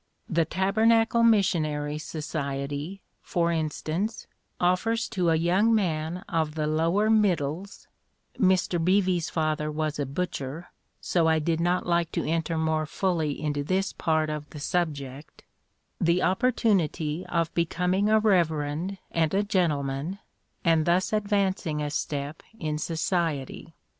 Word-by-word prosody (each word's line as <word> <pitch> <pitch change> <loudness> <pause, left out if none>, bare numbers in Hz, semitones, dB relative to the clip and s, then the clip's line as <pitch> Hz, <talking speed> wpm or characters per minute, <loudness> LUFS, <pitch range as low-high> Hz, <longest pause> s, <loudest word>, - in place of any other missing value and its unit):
The 165 -2 +1
Tabernacle 225 +6 +3
Missionary 155 -9 +2
Society, 150 +2 -4 0.2
for 170 -1 0
instance, 165 +6 -2 0.3
offers 220 +6 +1
to 180 -3 0
a 165 - +4
young 185 +8 +3
man 170 -3 -1
of 160 -5 -1
the 155 -1 -1
lower 165 +7 +2
middles" 190 -4 0 0.5
(Mr 185 -3 +2
Beevy's 185 -2 +2
father 155 -1 -1
was 155 -1 -2
a 140 - -1
butcher, 150 0 -4 0.3
so 170 -2 +1
I 160 0 +4
did 160 +1 0
not 175 +2 +1
like 170 -1 +1
to - - -1
enter 165 0 -1
more 160 -1 0
fully 160 -5 -1
into 145 -2 -1
this 190 +5 0
part 155 -1 0
of 150 -1 -5
the 150 - -9
subject) 145 -4 -3 0.6
"the 170 +2 +2
opportunity 185 - +1
of 170 -1 -1
becoming 180 +4 +1
a 220 - +5
reverend 170 -3 +1
and 160 -2 +1
a 200 - +3
gentleman, 155 -4 -1 0.5
and 165 -1 +3
thus 180 +4 +2
advancing 200 -6 0
a 150 -1 -2
step 145 0 -3 0.2
in 155 -1 -2
society. 165 -2 -2
165 Hz, 130 wpm, -27 LUFS, 155-185 Hz, 0.6 s, a